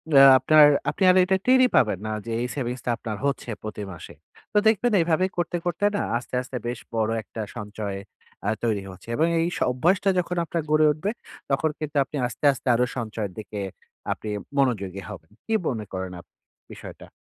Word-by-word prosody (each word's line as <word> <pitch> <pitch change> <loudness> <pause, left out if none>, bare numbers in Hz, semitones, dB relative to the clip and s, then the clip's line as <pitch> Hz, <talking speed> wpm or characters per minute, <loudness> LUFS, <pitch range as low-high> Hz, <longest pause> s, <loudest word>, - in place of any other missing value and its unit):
অ্যা 135 0 +10
আপনার 150 +3 +7 0.2
আপনি 200 - -2
আর - - +2
এটা 190 +1 +2
টেরই 255 0 +6
পাবেন 105 -6 +3
না - - -2
যে 115 - -5
এই 125 - -1
savings 125 -2 -3
টা - - -1
আপনার 110 -3 -5
হচ্ছে 140 -3 -1
প্রতি 110 -1 -5
মাসে। 85 - -10 0.4
তো - - +2
দেখবেন 225 +2 +3
এভাবে 165 +2 +2
করতে, 175 0 -1
করতে 175 +3 0
না - - 0 0.2
আস্তে, 120 - -10
আস্তে 125 0 -6
বেশ 120 0 -3 0.2
বড় 110 0 +1
একটা 110 - -7 0.2
সঞ্চয় 105 -2 -5 0.5
অ্যা 100 - +1
তৈরি 110 -4 0
হচ্ছে। 95 +3 -15
এবং 160 +5 +2
এই 165 - +2
স - - -5
অভ্যাসটা 180 +10 +2
যখন 180 0 -2
আপনার 170 +1 -2
গড়ে 155 0 +5
উঠবে, 155 +7 -2 0.4
তখন 135 +4 +2
কিন্তু 155 -1 -5
আপনি 140 - -10
আস্তে, 125 - -5
আস্তে 135 - -11
আরো 125 +1 +3
সঞ্চয়ের 110 -4 -3
দিকে 105 0 -7 0.5
আপনি 110 - -4 0.3
মনোযোগী 100 -8 0
হবেন। 85 -5 -10
কি 225 - -2
মনে 110 -4 -2
করেন 95 0 -4
আপনি - - -33 0.4
বিষয়টা? - - -11
125 Hz, 190 wpm, -25 LUFS, 105-165 Hz, 0.5 s, অ্যা